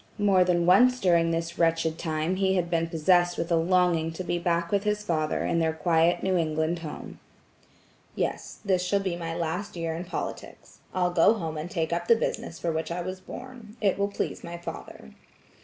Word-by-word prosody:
More 200 -3 +4
than 175 -1 +1
once 250 +8 +5
during 170 -4 +3
this 165 +1 -3
wretched 165 -1 +1
time 160 +3 -1
he 190 0 +2
had 175 -2 -1
been 165 -1 +1
possessed 175 +2 +2
with 170 +1 -3
a - - +5
longing 170 -1 +2
to 185 - -5
be 175 -1 -1
back 170 -1 0
with 200 -1 +1
his 210 0 -1
father 155 -5 -1
in 170 - +1
their 160 -1 +1
quiet 165 +1 +2
New 190 -1 +1
England 160 +1 0
home. 155 -3 -8 1.0
"Yes, - - -3
this 185 -2 +2
shall 200 +2 +1
be 190 -3 -2
my 165 -1 -4
last 175 +4 -3
year 165 -1 -2
in 170 +2 -5
politics. - - -7
I'll 180 -1 0
go 175 +5 +5
home 165 -6 -4
and 155 +3 -5
take 165 -3 -1
up 170 0 -2
the 230 - +6
business 225 -5 -3
for 170 - -2
which 160 0 -3
I 175 +1 -2
was 185 +1 -5
born; 240 +1 -10
it 200 -2 +1
will 200 - +2
please 200 - -4
my 170 0 -6
father." 120 - -9
175 Hz, 205 wpm, -27 LUFS, 165-185 Hz, 1.0 s, the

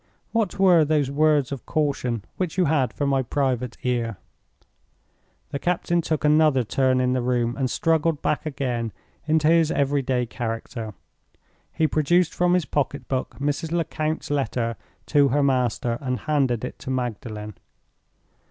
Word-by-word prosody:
What 225 -5 0
were 180 -4 +6
those 150 -3 +1
words 150 -2 +2
of 135 -3 -6
caution 135 -8 -1
which 180 -2 -2
you 185 - +4
had 140 -6 +2
for 145 - -2
my 135 -1 +2
private 130 -2 -1
ear?" 120 -4 -1 1.3
The 140 - -3
captain 175 0 0
took 155 -2 -2
another 150 -3 +4
turn 130 +3 +1
in 125 0 +2
the 130 - 0
room, 120 -1 0
and 130 -2 -1
struggled 160 0 +1
back 150 - -1
again 125 -6 -2 0.3
into 155 -1 +3
his 165 -1 +4
every 140 -1 +1
day 125 -2 0
character. 115 -2 -5 0.8
He 160 - +1
produced 165 +3 +2
from 180 0 +2
his 180 -4 +1
pocketbook 140 -2 -2
Mrs. 145 +3 -2
Lecount's 160 -2 -2
letter 125 -5 -1 0.3
to 145 -2 +4
her 140 +2 +2
master, 125 -3 0
and 125 -2 -2
handed 135 -6 0
it - - -8
to - - -7
Magdalen. 110 -4 -4
140 Hz, 150 wpm, -24 LUFS, 125-155 Hz, 1.3 s, were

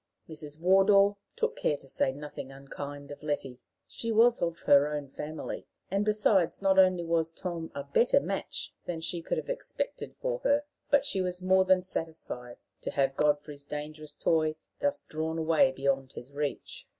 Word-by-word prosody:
Mrs. 150 -1 -6
Wardour 195 +3 +5 0.2
took 465 0 0
care 150 - 0
to 135 - -15
say 130 - +1
nothing 140 -1 -8
unkind 140 +1 -8
of 145 - -9
Letty. 135 -4 -3 0.3
She 230 - -3
was 230 +2 +5
of 170 -1 -1
her 140 0 +6
own 145 -2 -4
family; 150 +3 -6 0.2
and, 200 +1 +2
besides, 205 -5 +3
not 195 -1 +4
only 185 -2 +5
was 165 -1 +1
Tom 170 -1 -5
a 140 - -3
better 190 - +4
match 195 -8 -4
than 170 -2 -3
she 165 +1 -2
could - - -2
have - - -4
expected - - -3
for - - -1
her, 290 -12 +2 0.3
but 285 -1 +4
she 195 -8 0
was 180 0 -2
more 190 0 +4
than 185 -1 +4
satisfied 160 -9 -5 0.2
to - - -3
have 135 -1 +1
Godfrey's 145 -1 0
dangerous 150 +1 -7
toy 155 -1 +2 0.2
thus 285 0 0
drawn 160 +1 -3
away 160 -4 +4
beyond 135 0 -1
his 125 +3 -9
reach. 145 0 -4
160 Hz, 175 wpm, -30 LUFS, 145-190 Hz, 0.3 s, her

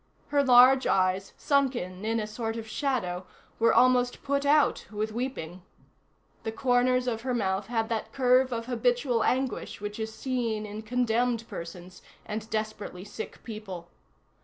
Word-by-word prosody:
Her 285 0 +3
large 255 +1 +7
eyes, 190 +1 +1
sunken 250 -10 0
in 225 +1 +1
a 215 - -2
sort 225 +1 -4
of 225 -1 -6
shadow, 215 -9 -2 0.3
were 230 0 +5
almost 250 0 +3
put 280 0 0
out 295 0 +3
with 215 +1 -3
weeping. 215 -8 -4 0.8
The 220 - -3
corners 250 +1 +2
of 230 -3 -2
her 255 0 -1
mouth 195 -3 -1
had 225 -1 0
that 225 -2 -2
curve 255 0 +3
of 230 -1 -3
habitual 245 0 +1
anguish 260 -1 -1
which 210 +1 -5
is 220 0 -3
seen 230 -3 -2
in 210 +1 -6
condemned 235 0 0
persons 180 -2 -8 0.2
and 215 +1 -5
desperately 215 -4 -4
sick 210 +2 -8
people. 195 -6 -7
230 Hz, 150 wpm, -28 LUFS, 210-250 Hz, 0.8 s, large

